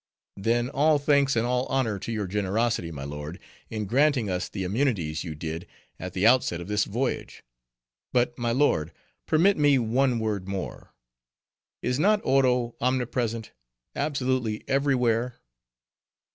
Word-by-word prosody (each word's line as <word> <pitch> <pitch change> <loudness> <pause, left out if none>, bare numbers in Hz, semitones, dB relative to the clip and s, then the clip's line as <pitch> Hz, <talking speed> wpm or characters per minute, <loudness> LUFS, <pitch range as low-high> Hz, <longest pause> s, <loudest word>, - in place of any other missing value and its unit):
"Then, 115 +4 +1
all 150 +3 +3
thanks 140 -2 +3
and 115 0 +2
all 125 +1 0
honor 120 -7 0
to 115 - -5
your 105 -3 -2
generosity, 105 0 0
my 70 -4 -6
lord, 75 +4 -6 0.3
in 110 -2 -3
granting 125 -1 +2
us 90 0 -2
the 95 - -4
immunities 95 - 0
you 80 -4 -6
did 80 +2 -5 0.3
at 90 0 -6
the 95 +2 0
outset 120 -8 +4
of 85 - -7
this 105 0 +1
voyage. 120 +6 -3 0.7
But, 120 -1 +1
my 120 -1 -1
lord, 115 - +1 0.3
permit 185 +6 +4
me 145 -2 +4
one 125 +2 +2
word 105 -4 -2
more. 95 -2 -6 0.9
Is 125 +2 0
not 210 +5 +4
Oro 125 -3 +2
omnipresent—absolutely 120 - -2
every 140 0 +2
where?" 120 0 0
115 Hz, 140 wpm, -26 LUFS, 95-130 Hz, 0.9 s, outset